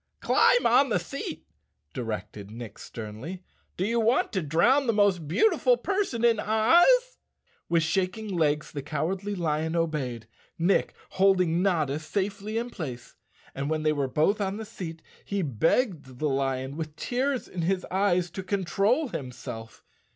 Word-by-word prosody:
" -, -, -50 dB
Climb -, -, +4 dB
on 275 Hz, -, +5 dB
the 210 Hz, -, +2 dB
seat," 275 Hz, -, -6 dB, 0.5 s
directed 105 Hz, -4 st, -5 dB
Nick 115 Hz, -1 st, -9 dB
sternly. 115 Hz, -, -7 dB, 0.2 s
" -, -, -42 dB
Do 185 Hz, -, 0 dB
you 230 Hz, +2 st, +1 dB
want 230 Hz, +2 st, +2 dB
to 190 Hz, -, 0 dB
drown 175 Hz, -, +3 dB
the 230 Hz, -, +3 dB
most 200 Hz, -6 st, +2 dB
beautiful 445 Hz, -, +3 dB
person 385 Hz, -, -1 dB
in 230 Hz, -2 st, +4 dB
Oz?" 345 Hz, -, +4 dB, 0.5 s
With 165 Hz, -1 st, +3 dB
shaking 185 Hz, +6 st, -1 dB
legs 150 Hz, -2 st, +1 dB
the 145 Hz, -, -4 dB
Cowardly 180 Hz, +8 st, -2 dB
Lion 160 Hz, -2 st, -1 dB
obeyed, 145 Hz, -9 st, -2 dB, 0.3 s
Nick 175 Hz, +4 st, +1 dB, 0.2 s
holding 185 Hz, -3 st, +3 dB
Notta 155 Hz, -7 st, +1 dB
safely 200 Hz, +6 st, -3 dB
in 240 Hz, +1 st, -3 dB
place, 130 Hz, -, -7 dB, 0.4 s
and 140 Hz, +2 st, -3 dB
when 155 Hz, -1 st, -1 dB
they 155 Hz, 0 st, +3 dB
were 140 Hz, -2 st, -1 dB
both 160 Hz, -, +1 dB
on 195 Hz, 0 st, -1 dB
the 220 Hz, -, -6 dB
seat 170 Hz, -7 st, -8 dB, 0.2 s
he 200 Hz, -2 st, -2 dB
begged 150 Hz, -, 0 dB
the 155 Hz, -, 0 dB
lion, 135 Hz, 0 st, -1 dB
with 155 Hz, -2 st, -5 dB
tears 255 Hz, -, -1 dB
in 180 Hz, -, -5 dB
his 185 Hz, +2 st, 0 dB
eyes, 180 Hz, -3 st, +1 dB
to 190 Hz, -, -5 dB
con¬ 195 Hz, +1 st, -2 dB
trol 230 Hz, -, +1 dB
himself. 120 Hz, -4 st, -7 dB
180 Hz, 160 wpm, -27 LUFS, 150-215 Hz, 0.5 s, on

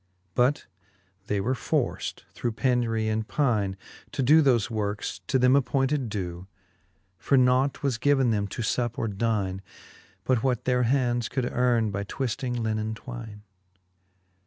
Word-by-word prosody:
But 125 Hz, +7 st, +2 dB, 0.6 s
they 105 Hz, -2 st, 0 dB
were 115 Hz, +7 st, 0 dB
forft 125 Hz, -, -2 dB
through 120 Hz, -, -2 dB
penury 115 Hz, -1 st, +1 dB
and 110 Hz, 0 st, -1 dB
pyne. 110 Hz, -10 st, 0 dB, 0.4 s
To 135 Hz, -, 0 dB
doe 155 Hz, +5 st, +6 dB
thofe 125 Hz, -7 st, +3 dB
workes, 105 Hz, -3 st, -3 dB
to -, -, +2 dB
them 125 Hz, +1 st, +5 dB
appointed 135 Hz, -1 st, +1 dB
dew: 90 Hz, -3 st, -5 dB, 0.7 s
For 140 Hz, -, +2 dB
nought 130 Hz, +3 st, +3 dB
was 130 Hz, -5 st, 0 dB
given 135 Hz, -3 st, +3 dB
them 100 Hz, -2 st, 0 dB
to 115 Hz, -, -5 dB
fup 120 Hz, +1 st, -1 dB
or 115 Hz, -, -1 dB
dyne. 100 Hz, -3 st, -1 dB, 0.6 s
But 125 Hz, 0 st, +1 dB
what 125 Hz, -2 st, 0 dB
their 125 Hz, -1 st, +2 dB
hands 120 Hz, -3 st, +1 dB
could 130 Hz, -2 st, -1 dB
earn 120 Hz, -3 st, +2 dB
by 100 Hz, +1 st, -3 dB
twifting 125 Hz, +3 st, -3 dB
linnen 110 Hz, 0 st, -1 dB
twyne. 115 Hz, -4 st, -9 dB
120 Hz, 145 wpm, -26 LUFS, 110-130 Hz, 0.7 s, doe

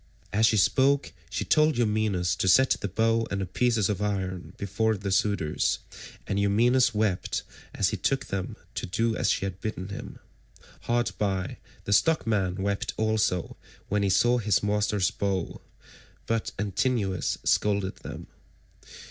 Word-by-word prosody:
As 110 Hz, +2 st, +4 dB
she 110 Hz, -, +3 dB
spoke, 135 Hz, +8 st, +3 dB, 0.2 s
she -, -, -3 dB
told 155 Hz, -3 st, +3 dB
Eumaeus 105 Hz, -7 st, +1 dB
to -, -, 0 dB
set 130 Hz, +9 st, +5 dB
the -, -, 0 dB
bow 115 Hz, +3 st, +1 dB
and 100 Hz, -, -2 dB
the 95 Hz, -, -1 dB
pieces 110 Hz, +2 st, +1 dB
of 105 Hz, -2 st, -2 dB
iron 95 Hz, -3 st, -3 dB
before 105 Hz, +2 st, 0 dB
the 100 Hz, 0 st, -4 dB
suitors, 95 Hz, -5 st, +1 dB, 0.5 s
and 100 Hz, -, -1 dB
Eumaeus 120 Hz, +6 st, +3 dB
wept 105 Hz, -4 st, -1 dB, 0.3 s
as -, -, +2 dB
he -, -, -3 dB
took 135 Hz, -1 st, 0 dB
them 95 Hz, -1 st, -4 dB, 0.2 s
to -, -, -4 dB
do 115 Hz, +5 st, 0 dB
as -, -, 0 dB
she -, -, +1 dB
had 95 Hz, 0 st, -6 dB
bidden 100 Hz, -3 st, -4 dB
him. 100 Hz, -, -7 dB, 0.7 s
Hard 120 Hz, 0 st, +1 dB
by, 95 Hz, -3 st, -1 dB, 0.3 s
the 100 Hz, -, 0 dB
stockman 105 Hz, -, +2 dB
wept 100 Hz, 0 st, -2 dB
also 110 Hz, -5 st, 0 dB, 0.3 s
when 105 Hz, +1 st, +1 dB
he 100 Hz, -, +1 dB
saw 120 Hz, +6 st, +3 dB
his 105 Hz, -4 st, +1 dB
master's 105 Hz, -1 st, +1 dB
bow, 95 Hz, -3 st, -2 dB, 0.6 s
but 115 Hz, -1 st, -1 dB
Antinous 100 Hz, -1 st, 0 dB
scolded 100 Hz, -2 st, +1 dB
them. -, -, -8 dB
105 Hz, 150 wpm, -27 LUFS, 95-115 Hz, 0.7 s, set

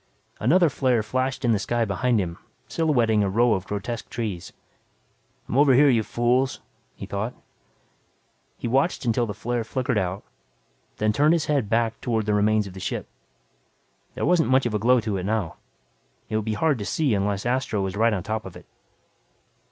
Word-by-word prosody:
Another 170 Hz, -, +4 dB
flare 130 Hz, -5 st, +1 dB
flashed 130 Hz, +4 st, -2 dB
in 120 Hz, -, +3 dB
the 105 Hz, -, +2 dB
sky 120 Hz, +2 st, 0 dB
behind 115 Hz, +4 st, +1 dB
him 85 Hz, -3 st, -3 dB, 0.3 s
silhouetting 120 Hz, -10 st, +2 dB
a 100 Hz, -, +1 dB
row 115 Hz, +4 st, +3 dB
of 95 Hz, -1 st, -3 dB
grotesque 110 Hz, +3 st, -4 dB
trees. 105 Hz, -7 st, -4 dB, 1.0 s
I'm 130 Hz, -, 0 dB
over 140 Hz, -3 st, +6 dB
here, 145 Hz, +2 st, +6 dB
you 115 Hz, -3 st, +3 dB
fools, 125 Hz, +4 st, 0 dB, 0.4 s
he -, -, -7 dB
thought. 110 Hz, +5 st, -4 dB, 1.2 s
He -, -, -4 dB
watched 135 Hz, +4 st, +1 dB
until 120 Hz, 0 st, +1 dB
the 105 Hz, -, -5 dB
flare 120 Hz, +2 st, -2 dB
flickered 125 Hz, 0 st, -1 dB
out, 95 Hz, +1 st, -3 dB, 0.7 s
then 105 Hz, 0 st, +1 dB
turned 150 Hz, +7 st, +4 dB
his 165 Hz, -2 st, +1 dB
head 140 Hz, -8 st, 0 dB
back 115 Hz, 0 st, 0 dB
toward 110 Hz, -3 st, -1 dB
the 105 Hz, -, 0 dB
remains 105 Hz, +1 st, +2 dB
of 95 Hz, -, -9 dB
the 95 Hz, -, -9 dB
ship. 90 Hz, -, -4 dB, 1.1 s
There -, -, -2 dB
wasn't 175 Hz, -5 st, +3 dB
much 130 Hz, 0 st, +3 dB
of 120 Hz, -, -1 dB
a 105 Hz, -, 0 dB
glow 125 Hz, +3 st, +4 dB
to 105 Hz, -3 st, -2 dB
it 90 Hz, -, -4 dB
now. 100 Hz, -4 st, -2 dB, 0.7 s
It 110 Hz, -, -2 dB
would 110 Hz, -1 st, -1 dB
be 110 Hz, -1 st, -1 dB
hard 150 Hz, +1 st, +1 dB
to 100 Hz, -, -4 dB
see 145 Hz, -1 st, 0 dB
unless 100 Hz, 0 st, -1 dB
Astro 120 Hz, -5 st, 0 dB
was 95 Hz, 0 st, -3 dB
right 115 Hz, +2 st, +3 dB
on 95 Hz, -5 st, -2 dB
top 110 Hz, +1 st, -3 dB
of 95 Hz, -, -11 dB
it. -, -, -12 dB
115 Hz, 190 wpm, -24 LUFS, 105-130 Hz, 1.2 s, over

